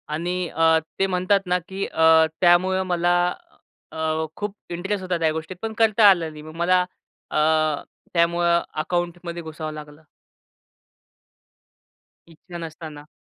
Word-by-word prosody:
आणि 175 +3 -2 0.2
अ, 160 0 +3 0.2
ते 195 - +3
म्हणतात 185 +2 +2
ना 180 0 +1
की 195 +1 -4
अ, 160 0 +5 0.2
त्यामुळं 185 +1 +4
मला 175 0 +2 0.8
अ, 160 0 -1
खूप 205 -1 -5
इंटरेस्ट 190 +3 -3
होता 180 -2 -1
त्या 160 -1 +2
गोष्टीत 160 +3 -5
पण 220 0 -4
करता 220 -2 +6
आलं 170 -4 +2
नाही. 150 - -11
मग 155 +1 -11
मला 180 +2 +3 0.5
अ, - - -1 0.8
त्यामुळं 170 0 +2 0.2
अकाउंटमध्ये 175 0 -3
घुसावं 155 -1 -6
लागलं. 150 0 -11 2.3
इच्छा 170 +2 -11
नसताना. 155 -2 -9
170 Hz, 125 wpm, -23 LUFS, 160-185 Hz, 2.3 s, करता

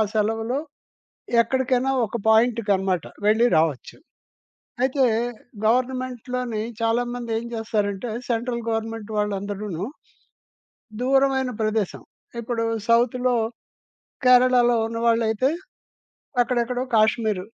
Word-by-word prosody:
సెలవులో 225 +4 0 0.8
ఎక్కడికైనా 260 +2 0
ఒక 220 +2 -4
పాయింట్‌కన్నమాట 205 -6 +2 0.2
వెళ్లి 220 +3 +4
రావచ్చు. 155 -4 0 0.9
అయితే 265 +1 +2 0.6
గవర్నమెంట్‌లోని 250 -1 -1 0.2
చాలామందేం 235 0 -1
చేస్తారంటే 210 -1 -2 0.2
సెంట్రల్ 235 0 -1
గవర్నమెంట్ 225 -1 -3
వాళ్ళందరూను 200 -3 -3 1.2
దూరమైన 270 0 +2
ప్రదేశం, 215 -2 -1 0.4
ఇప్పుడు 230 0 -2 0.2
సౌత్‌లో 245 +1 +3 0.9
కేరళలో 250 -1 +5
ఉన్నవాళ్లైతే 230 +1 +1 0.9
అక్కడెక్కడో 245 0 -1
కాశ్మీరు 215 -3 +2
230 Hz, 70 wpm, -23 LUFS, 215-250 Hz, 1.2 s, కేరళలో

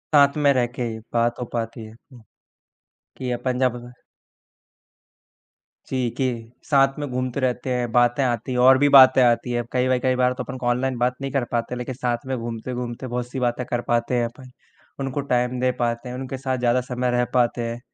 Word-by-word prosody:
साथ 140 +1 +5
में 140 - +6
रह 125 -2 +2
के 125 +1 -5
ही 110 -2 -4
बात 120 +1 +1
हो 125 - -3
पाती 115 0 -4
है। 110 - -12 0.2
उ 120 - -14 1.0
कि 130 -1 -4
अपन 125 +1 -2
जब 125 -2 +2 2.2
जी, 130 -2 0
कि 120 -3 -3
साथ 135 -1 +3
में 145 - -3
घूमते 125 +1 -2
रहते 130 -1 -1
हैं, 120 -2 -2
बातें 120 +3 +3
आती 125 +1 -1
हैं 125 - -1
और 130 +1 +7
भी 145 +2 +3
बातें 130 -1 +8
आती 120 +1 +2
हैं। 120 0 0
कई-कई 130 0 +1
बार 125 0 +2
तो - - -3
अपन 130 - -7
ऑनलाइन 125 +1 0
बात 125 +1 +1
नहीं 135 -1 -3
कर 135 -2 0
पाते, 120 +1 -2
लेकिन 125 +1 -5
साथ 120 -1 -2
में 130 -1 -2
घूमते-घूमते 120 +2 -5
बहुत-सी 125 +2 -4
बातें 125 0 -1
कर 120 0 -1
पाते 120 +1 +1
हैं 120 - +1
अपन। 125 +2 -10 0.5
उनको 135 +1 -2
टाइम 125 0 0
दे 130 0 +2
पाते 120 +1 -1
हैं, 125 - -6
उनके 130 0 -5
साथ 130 -1 -2
ज़्यादा 125 +1 +2
समय 125 0 -2
रह 120 0 +2
पाते 120 -1 +2
हैं। 115 +1 -5
125 Hz, 195 wpm, -23 LUFS, 120-130 Hz, 2.2 s, बातें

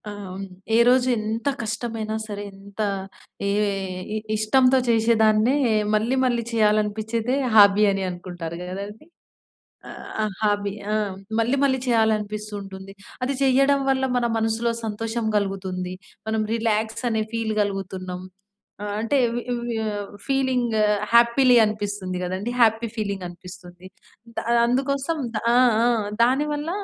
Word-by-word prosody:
ఆహ్, 205 - -7 0.2
హ్మ్ 195 +1 -5 0.3
ఏ - - +5
రోజు 255 0 +4
ఎంత 220 +3 -3
కష్టమైనా 225 -1 -3
సరే 205 -1 -5
ఎంత 195 +1 -16 0.7
ఏ - - +1 0.2
ఏ - - -2 0.4
ఇ - - 0 0.2
ఇష్టంతో 255 +5 +4
చేసేదాన్నే 225 +1 +3 0.4
మళ్ళీ 225 +5 +1
మళ్ళీ 240 -2 +1
చేయాలనిపించేదే 220 +2 +1 0.2
హాబీ 205 0 +7
అని 195 0 -2
అనుకుంటారు 175 -2 -7
గదండీ! 200 - -7 1.2
ఆహ్, 210 -2 -2
హాబీ 205 -2 0 0.2
ఆ! - - +2 0.4
మళ్ళీ 235 +4 +2
మళ్ళీ 265 -1 +1
చేయాలనిపిస్తూ 215 -2 0
ఉంటుంది. 195 0 -10 0.3
అది 270 +2 -1
చేయడం 275 +1 +4
వల్ల 265 0 0
మన 245 - +1
మనసులో 225 +1 0
సంతోషం 225 +2 -3
గలుగుతుంది. 190 -2 -3 0.4
మనం 220 0 0
రిలాక్స్ 220 0 -1
అనే 220 -1 0
ఫీల్ 225 -1 -1
గలుగుతున్నాం. 190 -2 -4 0.6
ఆహ్, 205 -1 -3
అంటే 230 +5 0
ఇవి 235 +1 -3
ఇవే 240 0 -4 0.6
ఫీలింగ్ 260 -4 +1 0.4
హ్యాపీలీ 240 +2 +6
అనిపిస్తుంది 205 -3 -3
గదండీ! 190 +6 -3
హ్యాపీ 225 0 +4
ఫీలింగ్ 200 -3 -3
అనిపిస్తుంది. 180 0 -12 0.5
దా - - -1 0.2
అందుకోసం 275 +5 0 0.2
దా 215 - -1
ఆ! - - +5 0.3
ఆ! - - +4 0.4
దాని 265 +5 +2
వల్ల 295 +2 -3
220 Hz, 125 wpm, -23 LUFS, 200-240 Hz, 1.2 s, హాబీ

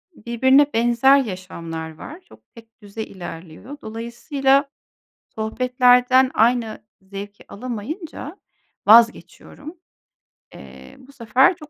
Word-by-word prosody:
birbirine 260 +5 +3
benzer 240 +4 +4
yaşamlar 170 - -6
var. 315 - -11
Çok 365 - -22
tek 225 -1 -18
düze 205 +2 -7
ilerliyor. 175 - -10
Dolayısıyla 265 +5 -1 0.7
sohbetlerden 250 +3 +2
aynı 230 -1 +1 0.2
zevki 200 +1 -10
alamayınca 275 - -7 0.5
vazgeçiyorum. 235 - +2 0.8
Eee, - - -14
bu 265 +1 -17
sefer 265 +7 +2
çok 305 -4 -14
235 Hz, 90 wpm, -21 LUFS, 215-270 Hz, 0.8 s, benzer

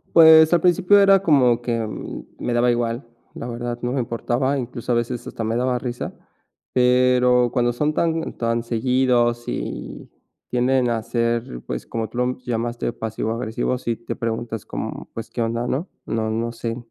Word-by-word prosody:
Pues, 160 0 +8
al 175 - +4
principio 185 +3 +4
era 195 -1 +6
como 130 -8 +4
que 120 -1 -1 0.6
me 120 - -2
daba 120 +1 +3
igual, 120 +1 -1 0.3
la 120 - -6
verdad, 120 0 -4
no 120 - -1
me 135 - -1
importaba, 120 +3 -1
incluso 120 -1 -3
a - - +2
veces, 120 +1 -2
hasta 115 - -5
me 110 +1 -1
daba 125 0 +1
risa, 120 0 -4 0.6
pero 125 -1 +4
cuando 120 -1 +1
son 150 +5 0
tan 165 0 0
tan 115 0 0
seguidos 120 0 +1
y - - -5 0.4
tienden 125 0 +2
a 115 -2 -1
ser, 115 - -1
pues, 60 -1 -4
como 115 -1 -3
tú 115 - -10
lo 125 +1 0
llamaste 120 0 -2
pasivo 110 0 -3
agresivos, 115 +2 -2
sí 115 -1 -2
te 115 - -6
preguntas 115 -1 -4
como, - - -6
pues: 115 - -6
"¿Qué 120 - -4
onda?, 115 +1 -1
¿no? 145 +9 -2 0.2
No 110 -1 -1
no 115 +1 -2
sé, 115 0 -4
120 Hz, 175 wpm, -22 LUFS, 115-125 Hz, 0.6 s, Pues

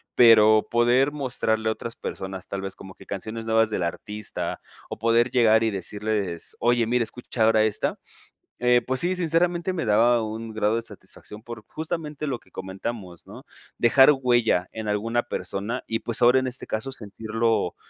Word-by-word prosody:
Pero 110 -2 +6
poder 120 +4 +3
mostrarle 115 -6 -1
a - - +2
otras 115 +1 -7
personas, 95 -1 -6
tal 100 -1 -4
vez 95 0 -6
como 95 -1 -11
que - - -15
canciones 110 +3 -6
nuevas 110 0 +3
del 95 -4 -2
artista, 105 +5 -4 0.3
o - - -6
poder 115 +2 +3
llegar 115 -3 +4
y 110 - +1
decirles: 100 -2 -3
"Oye, 120 -1 +2
mira, 125 0 +2
escucha 115 0 -3
ahora 110 -1 +4
esta", 110 - -1 0.6
eh, 125 0 +3
pues 130 0 -1
sí, 175 +2 0
sinceramente 175 +1 +1
me 160 -9 -3
daba 115 +2 +4
un 110 +1 -6
grado 110 0 +1
de 115 - -2
satisfacción 105 -1 -12
por 115 -2 -9
justamente 155 -2 -5
lo 135 -4 -2
que - - -26
comentamos, 95 -1 -7
¿no?, - - -12 0.3
dejar 130 +4 +6
huella 120 -7 +2
en 110 -1 -5
alguna 115 +3 0
persona 115 +1 -4
y 115 0 -2
pues 115 +1 -1
ahora 125 +2 +5
en 130 - -3
este 125 - -5
caso 130 +5 -3
sentirlo 110 -2 -2
115 Hz, 175 wpm, -24 LUFS, 105-125 Hz, 0.6 s, Pero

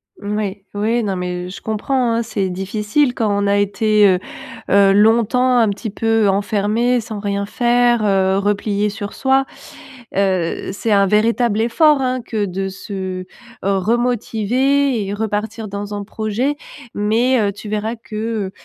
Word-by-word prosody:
Oui. - - -17
Oui, 205 -1 -3
oui 225 +3 0
non, 195 -2 -1
mais 180 0 -4
je 185 - -9
comprends, 235 +3 0
hein. 230 +1 0
C'est 210 -4 -2
difficile 210 +8 0
quand 225 -3 0
on 200 0 0
a 200 0 +2
été, 205 +1 +3
heu, 185 -2 +3 0.5
heu, 200 0 +5
longtemps 235 +4 +3
un 225 -2 +3
petit 205 +2 -4
peu 225 0 +1
enfermé 210 +5 +1
sans 220 -2 -7
rien 200 0 -2
faire, 240 +1 +2
heu, 190 -2 +2
replié 205 +1 0
sur 205 0 -6
soi. 265 0 +2 0.7
Heu, 185 -3 0
c'est 220 +3 -2
un 200 -1 +5
véritable 220 +1 +2
effort, 285 +5 +3
hein, 255 -1 -1
que 215 -3 -1
de 195 +1 -3
se 190 -1 -6 0.4
remotiver 240 +5 +1
et 200 - -3
repartir 220 +1 -3
dans 205 +1 -5
un 205 0 -4
projet. 220 +7 -2 0.4
Mais, 230 +5 +2
heu, 205 -2 +1
tu 205 +1 -10
verras 215 +2 -2
que, 220 -4 -4
210 Hz, 155 wpm, -18 LUFS, 200-235 Hz, 0.7 s, heu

